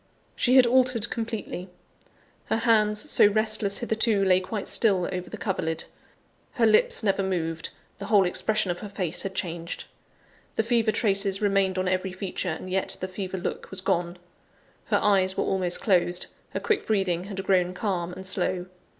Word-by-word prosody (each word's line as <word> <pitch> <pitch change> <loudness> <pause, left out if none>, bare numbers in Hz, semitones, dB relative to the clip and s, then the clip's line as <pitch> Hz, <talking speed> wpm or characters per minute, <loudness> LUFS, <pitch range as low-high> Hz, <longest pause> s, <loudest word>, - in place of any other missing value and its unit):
She 250 +1 +2
had 260 -2 +8
altered 245 -2 +2
completely. 220 -5 -5 0.8
Her - - 0
hands, 215 -2 +2
so - - +7
restless 215 -1 +1
hitherto, 220 -3 +1
lay 185 -1 +4
quite 200 +2 -5
still 195 -6 +4
over 180 0 -5
the - - -7
coverlid; 160 -5 -2 0.7
her 235 - +2
lips 215 0 +3
never 195 -1 +1
moved; 165 -4 -2 0.3
the 200 - -6
whole 205 -3 +4
expression 215 +2 0
of 175 - -5
her 210 - -7
face 180 -4 -2
had 190 -1 -5
changed 170 -2 -4 0.7
the 225 - +1
fever 230 -1 +2
traces 200 -2 +1
remained 195 -2 +1
on 185 0 0
every 185 0 -1
feature, 190 -1 -3
and 160 +3 -5
yet 190 0 0
the 185 - -3
fever 190 0 -5
look 175 - -5
was 190 - -4
gone. 175 -1 -1 0.7
Her - - +2
eyes 190 -2 +3
were - - +1
almost 180 -2 -1
closed; 180 -3 +2 0.2
her - - -4
quick 440 - -1
breathing 190 -4 0
had 195 -1 -5
grown 180 -2 +1
calm 180 -4 -2
and 190 +1 -8
slow. 185 -1 -1
195 Hz, 170 wpm, -26 LUFS, 180-215 Hz, 0.8 s, had